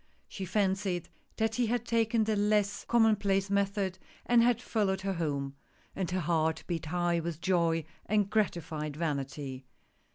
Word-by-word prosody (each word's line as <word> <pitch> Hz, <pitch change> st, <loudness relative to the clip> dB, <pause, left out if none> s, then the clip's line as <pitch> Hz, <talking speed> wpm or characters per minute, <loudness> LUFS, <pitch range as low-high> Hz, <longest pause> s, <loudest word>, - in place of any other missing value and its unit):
She 190 Hz, -, -6 dB
fancied 190 Hz, -2 st, 0 dB, 0.3 s
that 220 Hz, 0 st, +1 dB
he 245 Hz, -2 st, +2 dB
had 240 Hz, +1 st, -1 dB
taken 230 Hz, -1 st, +2 dB
the 215 Hz, 0 st, +1 dB
less 205 Hz, 0 st, +1 dB
commonplace 205 Hz, -4 st, +3 dB
method, 200 Hz, -1 st, 0 dB, 0.3 s
and 240 Hz, -1 st, +5 dB
had 235 Hz, -1 st, +3 dB
followed 200 Hz, -6 st, 0 dB
her 195 Hz, 0 st, -1 dB
home, 140 Hz, -5 st, -2 dB, 0.4 s
and 190 Hz, -3 st, -2 dB
her 185 Hz, 0 st, -1 dB
heart 160 Hz, -1 st, +1 dB
beat 165 Hz, -3 st, -3 dB
high 175 Hz, 0 st, +1 dB
with 165 Hz, -1 st, -4 dB
joy 170 Hz, -3 st, +1 dB, 0.2 s
and 210 Hz, 0 st, +2 dB
grati 200 Hz, -5 st, +1 dB
fied 155 Hz, -2 st, -5 dB
vanity. 140 Hz, -4 st, -3 dB
190 Hz, 155 wpm, -31 LUFS, 165-210 Hz, 0.4 s, and